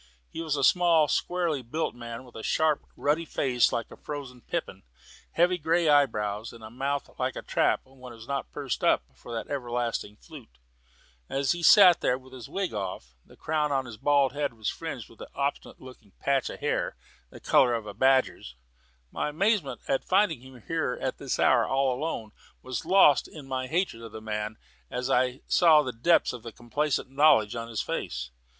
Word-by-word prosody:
He - - -5
was 155 -3 -1
a 140 - -1
small, 170 -1 +4
squarely 170 -3 0
built 140 +7 -3
man, 120 0 -8
with 125 - -16
a 110 - -6
sharp 155 +5 +1
ruddy 150 +3 +1
face 125 -6 +1
like 115 -2 -3
a - - -9
frozen 140 -5 -8
pippin, - - -4 0.5
heavy 180 +2 +3
grey 165 +2 +1
eyebrows, 110 -7 +1
and 115 -1 -13
a 110 - -9
mouth 140 +3 -2
like - - -1
a - - -6
trap - - +1
when 130 -1 -13
it - - -11
was 115 +1 -13
not 140 0 -3
pursed 140 -3 -4
up - - +3
for 65 - -12
that 115 -1 -4
everlasting 120 -5 -3
flute. 60 -10 -14 0.7
As 135 0 0
he 175 - -2
sat 180 0 +7
there 125 - +2
with 130 0 -17
his 125 -3 -10
wig 195 -6 -2
off, 95 - -5
the - - -19
crown 150 -1 -1
of 135 -2 0
his 120 -3 -9
bald 140 +1 +2
head 145 -3 -2
was 110 -2 -2
fringed 160 -8 -6
with 115 - -17
an - - -7
obstinate 140 0 -3
looking 125 -6 -14
patch 135 -2 +1
of - - -9
hair, - - -1 0.3
the - - -13
colour 120 -2 +4
of 115 -2 -4
a 105 - -7
badger's. 130 - +1 0.6
My - - -2
amazement 190 -1 0
at 135 - 0
finding 185 - +2
him 130 -3 -14
here 160 -6 -1
at 130 - -3
this 135 - -2
hour, - - +4
and - - -6
alone, 135 -3 -1 0.3
was 130 +4 -4
lost 180 -6 +5
in 150 -4 -11
my 130 -1 -3
hatred 165 -6 -1
of 115 -2 -10
the 110 - -6
man 105 0 -4 0.3
as 125 +2 -3
I 125 +1 +1
saw 160 -4 +5
the 130 -3 -4
depths 145 +8 +3
of 125 - -8
complacent 135 +2 -2
knowledge 135 -7 +4
in 115 0 -4
his 115 -2 -3
face. 60 0 -4
130 Hz, 195 wpm, -27 LUFS, 115-150 Hz, 0.7 s, sat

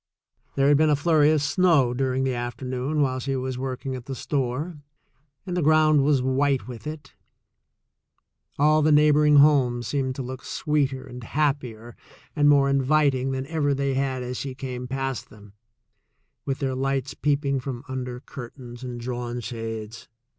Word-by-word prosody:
There 140 0 +3
had 145 0 +5
been 155 +1 +3
a 150 - +4
flurry 150 0 +3
of 155 -2 +2
snow 145 -5 +3
during 130 +1 0
the 130 -1 0
afternoon 125 +4 -2
while 130 -1 -1
she 135 +1 -2
was 130 -1 -3
working 130 0 -4
at 125 0 -9
the 135 - -4
store, 145 +5 -3 0.7
and 180 -2 -4
the 180 - 0
ground 155 -1 +4
was 140 -3 +2
white 135 0 +1
with 125 +3 -8
it. 155 -1 -8 1.4
All 155 +1 +4
the 155 +1 +3
neighboring 150 0 +5
homes 135 -5 +4
seemed 130 +1 -1
to 135 - -4
look 130 +1 -7
sweeter 140 -3 -1
and 125 -2 -10
happier 125 -5 -2 0.4
and 145 -1 +4
more 140 -1 +5
inviting 140 -1 +2
than 130 0 -3
ever 145 -2 0
they 140 0 -1
had 130 -1 -1
as 125 0 -5
she 135 -2 -5
came 125 -2 -6
past 135 -1 -3
them, 105 -2 -16 0.9
with 135 -1 -2
their 135 -2 -2
lights 135 0 -1
peeping 140 -1 0
from 130 -1 -6
under 125 -2 -5
curtains 120 -2 -10
and 125 -1 -6
drawn 120 0 -4
shades. 115 -1 -6
135 Hz, 165 wpm, -25 LUFS, 125-145 Hz, 1.4 s, had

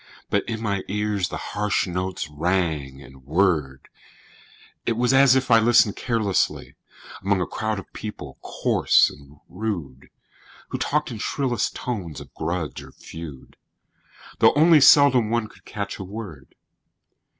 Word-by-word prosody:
But 100 - +2
in 110 -1 -3
my 100 -3 -1
ears 105 -3 -1
the - - -5
harsh 105 0 -1
notes 90 -1 -3
rang 75 -4 -2
and 65 -1 -16
whirred; 75 -4 0 1.0
It 115 - 0
was 125 +2 +2
as 135 -1 +6
if 130 -1 0
I 115 - +7
listened 115 -2 +4
carelessly 110 -6 -1 0.5
Among 100 0 +1
a 90 - 0
crowd 110 -1 -3
of 95 - -10
people 75 -11 -8
coarse - - +2
and 70 0 -16
rude, 85 -10 -5 0.6
Who - - -4
talked 150 -2 -1
in 115 - -6
shrillest 125 0 -1
tones 95 - -5
of - - -13
grudge 80 -2 -4
or - - -13
feud, 80 -5 -11 0.8
Though - - +6
only 155 0 +6
seldom 135 -6 +6
one 115 -1 0
could - - -21
catch 100 -2 -5
a - - -5
word. 95 -9 -9
100 Hz, 145 wpm, -23 LUFS, 80-115 Hz, 1.0 s, I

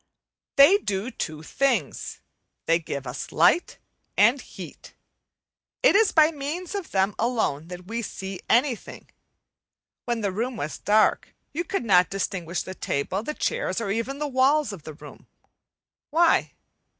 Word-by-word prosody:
They 310 +9 +7
do 205 - -3
two 155 -8 -5
things 235 - -1 0.4
they 165 +1 +3
give 140 -4 -5
us 125 +1 -6
light 175 - +3 0.4
and - - +5
heat. - - -11 0.9
It - - +6
is 435 -1 +5
by 310 0 +5
means 315 +6 -5
of 395 -4 -4
them 195 +1 +1
alone 220 - 0
that 180 0 -9
we 230 +4 -3
see 195 -3 -6
anything. 245 0 0 0.9
When 235 -2 -1
the 200 -2 0
room 235 +5 -3
was 150 +2 -4
dark 215 +1 +2 0.2
you 335 +4 -1
could 355 -5 -3
not 180 -4 +5
distinguish 185 -3 -3
the 185 - -7
table, 185 +3 -2
the 300 +7 -5
chairs, 485 - -1
or 200 -4 -2
even 230 +6 -2
the 295 0 -2
walls 270 -2 +2
of 175 -7 -11
the 155 - -7
room. - - -13 0.8
Why? 330 +2 +3
225 Hz, 150 wpm, -25 LUFS, 185-290 Hz, 0.9 s, They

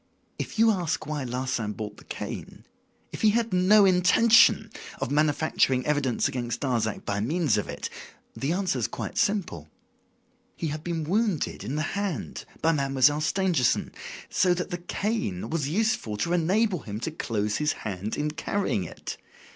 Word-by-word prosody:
If - - -5
you 225 0 +6
ask 180 -6 -1
why 150 -3 -3
Larsan 125 -3 -2
bought 105 -1 -6
the - - -14
cane, - - -7 0.5
if - - -7
he 215 - +6
had 230 0 +1
no 195 +3 +6
intention 190 +5 +5 0.3
of 120 - -2
manufacturing 145 -3 +2
evidence 145 -5 +1
against 120 -2 -3
Darzac 115 -6 -1
by 100 - -1
means 145 +2 +1
of 105 - -2
it, - - -4 0.5
the 140 +3 -1
answer 180 -7 0
is 110 - 0
quite - - -6
simple. 175 - -1 0.9
He 165 - -3
had 150 +1 -5
been 170 -2 -2
wounded 195 - 0
in 125 +8 -3
the 155 - 0
hand 200 -3 -3 0.2
by 165 - +5
Mademoiselle 140 0 +3
Stangerson, 165 -6 +1 0.4
so 180 -1 +2
that 180 +2 -4
the 175 - -3
cane 175 - -2
was 150 -4 -1
useful 180 - 0
to 170 +11 0
enable 185 +3 +2
him 105 -5 -6
to 160 - -2
close 105 -8 -1
his 150 0 +1
hand 100 +1 -3
in 150 +1 -1
carrying 160 - -1
it. 85 - -7
150 Hz, 165 wpm, -27 LUFS, 125-185 Hz, 0.9 s, you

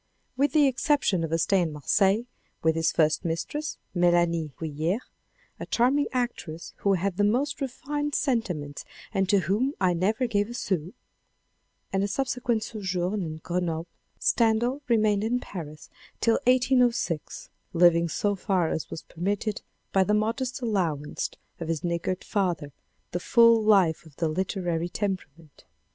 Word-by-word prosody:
With 280 +3 +1
the 300 -2 +5
exception 270 - +2
of 160 - -3
a 165 - +2
stay 180 +3 +2
in 165 -2 -1
Marseilles, 195 - +2 0.4
with 160 0 +3
his 165 0 +2
first 155 0 +2
mistress 175 - -3 0.2
Melanie 175 -3 +2
Guilhert 160 - -1 0.3
(" - - -36
a - - -6
charming 265 +5 +2
actress 240 -10 -3
who 200 - +2
had 190 0 -1
the 205 - +3
most 255 +9 +1
refined 290 +2 -3
sentiments 180 - -1 0.3
and 195 -2 +1
to 200 -1 +4
whom 215 - 0
I 185 -2 +3
never 210 +9 +1
gave 205 -2 0
a 240 - -6
sou,") 185 -7 -2 1.0
and 195 0 +2
a - - +1
subsequent 250 -2 -1
sojourn 190 -2 -2
in 160 -2 -5
Grenoble, 170 -2 -2 0.3
Stendhal 235 +4 +2
remained 215 -3 +3
in 240 +3 +1
Paris 155 -9 -8 0.3
till 230 -1 +3
1806, 245 - +2 0.2
living 170 -1 +5
so 205 +5 0
far 185 -3 0
as 160 - -3
was - - -7
permitted 200 +4 -2 0.3
by 190 - +4
the 210 +2 +2
modest 245 +5 -1
allowance 165 -10 -1 0.3
of 165 - -5
his 165 -2 -2
niggard 175 +1 -2
father 175 -8 -1 0.4
the 175 - -2
full 230 +3 +5
life 195 -7 +4
of 150 - -18
the 165 0 0
literary 175 -1 -1
temperament. 170 -7 -5
195 Hz, 150 wpm, -27 LUFS, 165-230 Hz, 1.0 s, the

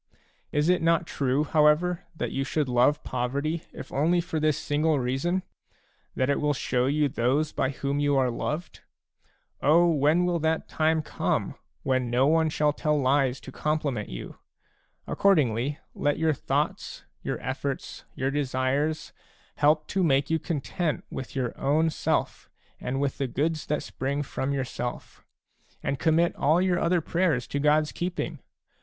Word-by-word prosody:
Is 150 +1 +1
it 180 -1 +3
not 165 +1 +3
true, 140 -1 0
however, 155 +3 +3
that - - -3
you 135 - -1
should 145 +1 -1
love 125 +4 +3
poverty, 140 +7 -2
if - - -9
only 165 +6 +2
for 165 -2 -2
this 155 -1 +2
single 150 +1 +1
reason, 135 +9 0 0.3
— - - -39
that 130 - +1
it 140 - +1
will 150 -1 +1
show 125 -1 0
you 145 +1 +2
those 135 +4 0
by 130 - 0
whom 140 +1 -2
you 145 -1 +2
are 130 -2 +2
loved? 150 +7 -4 0.8
O 165 +4 +5
when 160 +2 +3
will 175 -1 +1
that 160 +1 0
time 160 0 +1
come, - - -1 0.3
when 130 -2 +1
no 125 +2 +3
one 160 +2 +3
shall 150 -1 +1
tell 150 0 0
lies 135 -1 +2
to 130 - -10
compliment 145 -7 -2
you! - - -8 0.7
Accordingly, 145 - +2 0.2
let 145 0 0
your 160 -1 +2
thoughts, - - -2 0.2
your - - -3
efForts, - - -4
your 135 +1 -1
desires, 140 +2 -1 0.4
help 150 +1 +3
to 190 - 0
make 140 -2 +2
you 160 - +2
content 155 0 -2
with 130 - -6
your 125 -3 -2
own 155 +4 +2
self - - -1 0.3
and 130 +2 -3
with 140 -1 -1
the 135 - 0
goods 155 +5 -1
that 150 - -1
spring 140 +2 -2
from 135 0 -3
yourself; 125 -3 -4 0.6
and 140 - -1
commit 165 +1 +2
all 155 +5 +3
your 180 -1 +2
other 170 0 +2
prayers 160 -7 +1
to 140 - -3
God's 150 +1 +3
keeping 170 -3 -3
150 Hz, 160 wpm, -27 LUFS, 135-160 Hz, 0.8 s, O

